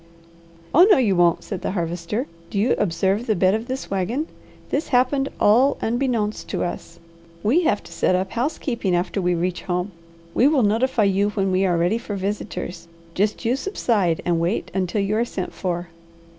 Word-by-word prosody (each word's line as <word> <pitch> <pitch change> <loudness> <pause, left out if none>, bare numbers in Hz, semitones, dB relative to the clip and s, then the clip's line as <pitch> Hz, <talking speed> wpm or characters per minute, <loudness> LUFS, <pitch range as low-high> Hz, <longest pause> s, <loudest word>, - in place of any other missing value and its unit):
"Oh 345 +6 +8
no 405 - +7
you 220 -7 +2
won't!" 175 -1 +3
said 195 -4 -5
the - - -2
Harvester. 175 +6 -2 0.2
"Do - - -4
you 225 +5 +3
observe 195 +4 0
the 215 - +2
bed 185 +1 +3
of 220 +2 -2
this 260 -4 -5
wagon? 200 - -1 0.5
This 290 +4 0
happened 270 +2 +2
all 250 +7 +4
'unbeknownst' 230 -3 -1
to - - -1
us. 170 -1 -6 0.5
We 300 +12 +3
have 205 - +1
to - - -14
set 185 - +1
up 190 +1 -1
housekeeping 235 - -1
after 180 +3 -1
we 180 -1 +1
reach 180 +1 -2
home. 180 +1 -2 0.4
We 255 - +4
will 290 -4 +3
notify 225 +3 +2
you 200 +1 +2
when 195 -2 -1
we 190 +1 +2
are 175 -2 +1
ready 175 +7 +1
for 210 -3 -5
visitors. 185 -3 -4 0.3
Just 210 +5 -1
you 240 +3 +2
subside 220 - 0
and 170 -1 +1
wait 170 +6 -1
until 190 +2 0
you 200 +2 0
are 230 - +2
sent 190 -6 -5
for." 175 -2 -3
205 Hz, 185 wpm, -22 LUFS, 180-240 Hz, 0.5 s, Oh